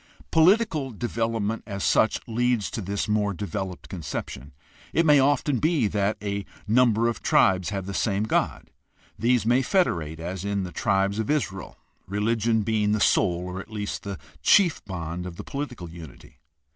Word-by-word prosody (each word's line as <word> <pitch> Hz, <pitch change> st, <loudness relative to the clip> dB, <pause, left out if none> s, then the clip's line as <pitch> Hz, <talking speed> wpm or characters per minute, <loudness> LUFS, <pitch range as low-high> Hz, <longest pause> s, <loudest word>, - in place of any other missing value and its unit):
Political 160 Hz, -, +3 dB
development 115 Hz, -1 st, -2 dB
as 100 Hz, -2 st, -4 dB
such 110 Hz, -, +3 dB
leads 120 Hz, -2 st, 0 dB
to 115 Hz, -, -4 dB
this 100 Hz, +1 st, -2 dB
more 105 Hz, -2 st, +1 dB
developed 95 Hz, -1 st, -5 dB
conception. 70 Hz, -5 st, -6 dB, 0.4 s
It 165 Hz, -, +3 dB
may 150 Hz, -2 st, +6 dB
often 140 Hz, -1 st, +2 dB
be 155 Hz, -6 st, +2 dB
that 100 Hz, +1 st, 0 dB
a 100 Hz, 0 st, -2 dB, 0.2 s
number 115 Hz, 0 st, +3 dB
of 120 Hz, -, -2 dB
tribes 95 Hz, -2 st, +3 dB
have 100 Hz, -2 st, -4 dB
the 100 Hz, -, -5 dB
same 100 Hz, 0 st, 0 dB
god. 110 Hz, -, -1 dB, 0.5 s
These 120 Hz, -2 st, +2 dB
may 120 Hz, +3 st, +4 dB
federate, 85 Hz, -, 0 dB
as 90 Hz, +2 st, -5 dB
in 100 Hz, -1 st, -1 dB
the 90 Hz, -, -6 dB
tribes 100 Hz, 0 st, 0 dB
of 110 Hz, -, -2 dB
Israel, 100 Hz, -11 st, -2 dB, 0.3 s
religion 110 Hz, +3 st, +1 dB
being 105 Hz, -1 st, +1 dB
the 105 Hz, -, +1 dB
sole 90 Hz, -4 st, +2 dB
or 90 Hz, +1 st, -5 dB
at 100 Hz, -, -9 dB
least 105 Hz, -2 st, -4 dB
the 100 Hz, -4 st, -5 dB, 0.2 s
chief 185 Hz, -6 st, +4 dB
bond 90 Hz, -1 st, -5 dB
of 90 Hz, -, -8 dB
the -, -, -7 dB
political 135 Hz, -10 st, -5 dB
unity. 80 Hz, -5 st, -12 dB
105 Hz, 165 wpm, -25 LUFS, 95-120 Hz, 0.5 s, may